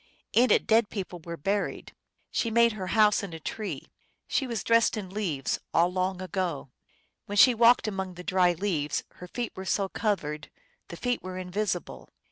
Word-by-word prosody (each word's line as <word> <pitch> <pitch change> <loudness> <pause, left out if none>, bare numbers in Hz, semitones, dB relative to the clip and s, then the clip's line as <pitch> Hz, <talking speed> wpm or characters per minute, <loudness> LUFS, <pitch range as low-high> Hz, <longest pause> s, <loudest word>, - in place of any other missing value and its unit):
In 245 +2 +5
it - - +4
dead 225 -1 +3
people 185 -3 -5
were 170 0 -6
buried. 200 +6 -2 0.4
She 230 - 0
made 235 +1 +4
her 195 -4 -5
house 210 0 +4
in 195 -4 -7
a 165 - -6
tree; 210 +6 -5 0.4
She 270 - 0
was 230 -4 -3
dressed 230 -1 +3
in 190 -3 -6
leaves, 180 -10 -2 0.2
All 175 +2 +3
long 185 0 -1
ago. 180 -8 -3 0.6
When 205 - -4
she 250 +4 +8
walked 235 0 +5
among 190 -3 -4
the 180 - -9
dry 180 -1 +3
leaves 165 -5 -1
Her 180 - -9
feet 240 +5 -4
were 190 - -6
so 195 0 0
covered 155 -10 -2 0.4
The 170 - -9
feet 245 +4 -1
were 185 0 -6
invisible. 185 0 -3
190 Hz, 180 wpm, -28 LUFS, 180-215 Hz, 0.6 s, she